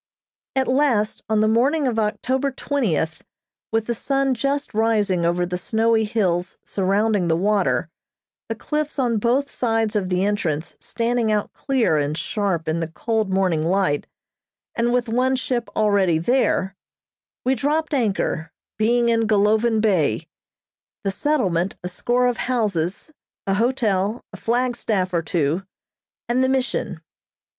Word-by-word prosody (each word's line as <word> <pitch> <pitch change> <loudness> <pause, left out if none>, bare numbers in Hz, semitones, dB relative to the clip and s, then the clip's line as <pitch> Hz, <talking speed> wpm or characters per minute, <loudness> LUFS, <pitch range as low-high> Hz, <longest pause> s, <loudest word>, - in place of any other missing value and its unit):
At 265 -1 +1
last, 255 -6 +1
on 215 -1 +3
the 215 - +3
morning 270 +7 +2
of 235 -3 0
October 255 +6 0
twentieth, 220 - -1 0.5
with 225 0 +1
the 235 - -1
sun 270 +3 0
just 280 +3 -2
rising 210 -6 +2
over 175 +1 +1
the 180 0 -3
snowy 225 +3 +2
hills 185 -6 -1
surrounding 200 0 +1
the 165 - +2
water, 205 +3 +1 0.6
the - - -2
cliffs 300 -1 -3
on 240 -5 +1
both 255 +6 +1
sides 225 -2 0
of 190 -3 0
the 180 +1 +1
entrance 170 -7 -1
standing 235 -1 -1
out 210 -1 -1
clear 255 - +1
and 145 +1 -1
sharp 170 0 -1
in 160 +1 0
the 165 - -2
cold 220 +5 -1
morning 185 -4 +1
light, 175 -3 +1 0.7
and 235 +1 +1
with 245 0 +1
one 255 +3 +1
ship 250 -2 -2
already 200 -6 +3
there, 190 -1 +1 0.7
we 260 - +3
dropped 300 +5 0
anchor, 195 - 0 0.3
being 235 +2 +3
in 230 -1 +2
Golovin 220 +2 +3
Bay. 175 - +1 0.8
The 195 - 0
settlement, 190 - 0
a - - -2
score 240 +7 0
of 245 -1 +1
houses, 210 - -1 0.3
a 195 - +1
hotel, 220 -2 0
a - - -7
flagstaff 230 -6 0
or 170 - +2
two, 160 +1 0 0.7
and 250 +2 +2
the 260 - +2
Mission. 250 -10 -1
220 Hz, 145 wpm, -22 LUFS, 185-245 Hz, 0.8 s, on